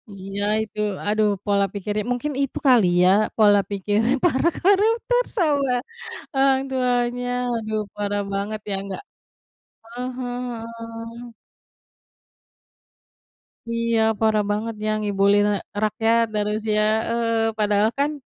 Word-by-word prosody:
Iya 195 +1 -5 0.2
itu 215 0 -10 0.3
aduh 210 +1 +2 0.2
pola 200 -1 +2
pikirnya 205 +1 -3
mungkin 265 +4 -2
itu 275 - -2
kali 245 -6 +6 0.2
ya 180 - +6 0.3
pola 205 -2 +6
pikirnya 205 +4 0
para 310 -2 +2
koruptor 450 +6 +3 0.2
sama 285 -6 +2 0.6
orang 270 0 +4
tuanya 245 -1 0 0.3
aduh 215 -1 -2 0.2
parah 205 0 -2
banget 205 +2 -3
ya - - 0
nggak, 195 -1 -6 0.9
ah 245 +2 -5
hah, 245 -2 -4
heeh. 230 +1 -9 2.4
Iya 230 0 0 0.2
parah 220 -1 +2
banget 220 +2 -2
ya - - 0
ngibulin, 205 0 +3
eee, 200 - -2 0.2
rakyat 225 +2 +2
dan 210 -1 +1
harusnya, 215 0 0 0.3
eee, 230 -1 0
padahal 210 0 +3
kan 285 +2 +2
225 Hz, 120 wpm, -23 LUFS, 210-245 Hz, 2.4 s, kali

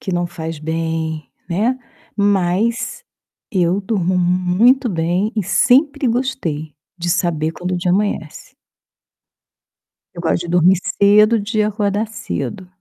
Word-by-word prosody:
Que 190 - -4
não 175 0 0
faz 165 -2 -6
bem, 160 0 -3 0.2
né? 225 +9 0 0.4
Mas 205 - 0 0.5
eu 185 0 +1
durmo 190 -3 -1
muito 185 +9 +3
bem 175 +3 0
e 210 - +1
sempre 275 - +3
gostei, 225 - -2 0.2
de 175 0 -3
saber 165 -3 0
quando 180 +2 -5
o 180 - 0
dia 175 0 0
amanhece. 195 -6 -2 1.6
Eu 170 - -7
gosto 165 - +1
de 175 - -6
dormir 180 +1 +4 0.2
cedo, 210 +3 +5
de 215 +1 -1
acordar 210 0 -1
cedo. 210 -3 -5
185 Hz, 125 wpm, -18 LUFS, 170-215 Hz, 1.6 s, cedo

